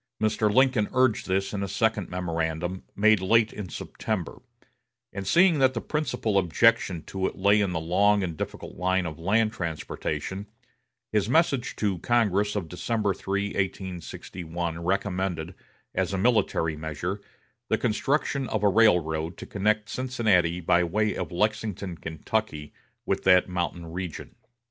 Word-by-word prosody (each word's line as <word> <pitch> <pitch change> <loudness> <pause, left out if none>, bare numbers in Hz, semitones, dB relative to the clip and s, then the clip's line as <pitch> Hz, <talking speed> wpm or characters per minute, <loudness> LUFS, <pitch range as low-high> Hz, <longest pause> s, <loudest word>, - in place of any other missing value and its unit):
Mr. 110 0 +1
Lincoln 130 -3 +3
urged 130 -3 +2
this 95 +1 0
in 100 - -2
a 100 - -2
second 105 0 0
memorandum, 85 0 -2
made 110 -1 +4
late 110 +3 +3
in 100 -4 -6
September; 110 0 -4 0.7
and 100 -1 -5
seeing 170 -3 +5
that 130 -1 +3
the - - 0
principal 115 -8 0
objection 85 -1 +2
to 95 -1 -2
it - - -6
lay 100 +2 +4
in 100 -3 0
the 85 - -1
long 100 +5 +3
and 85 -3 -3
difficult - - -6
line 95 +1 +1
of 80 -1 -6
land 110 +5 +2
transportation, 85 +3 -4 0.6
his 105 0 +1
message 135 -4 +2
to 100 -4 -1
Congress 105 -3 +1
of 95 -5 -2
December 100 +4 -1
3, 100 +2 -2
1861, 85 -3 -4
recommended, 95 -2 -1 0.4
as - - -1
a - - 0
military 95 -7 +2
measure, 80 +6 -4 0.5
the - - +3
construction 135 +3 0
of 110 -2 -2
a 100 - +5
railroad 85 -6 +2
to - - -8
connect 105 +1 0
Cincinnati, 110 -11 +1
by 90 +1 +3
way 105 +5 0
of - - -4
Lexington, 105 -1 -1
Kentucky, 80 0 -3 0.3
with - - -1
that 90 -1 +6
mountain 90 -1 -3
region. 90 -1 -6
95 Hz, 145 wpm, -26 LUFS, 90-110 Hz, 0.7 s, that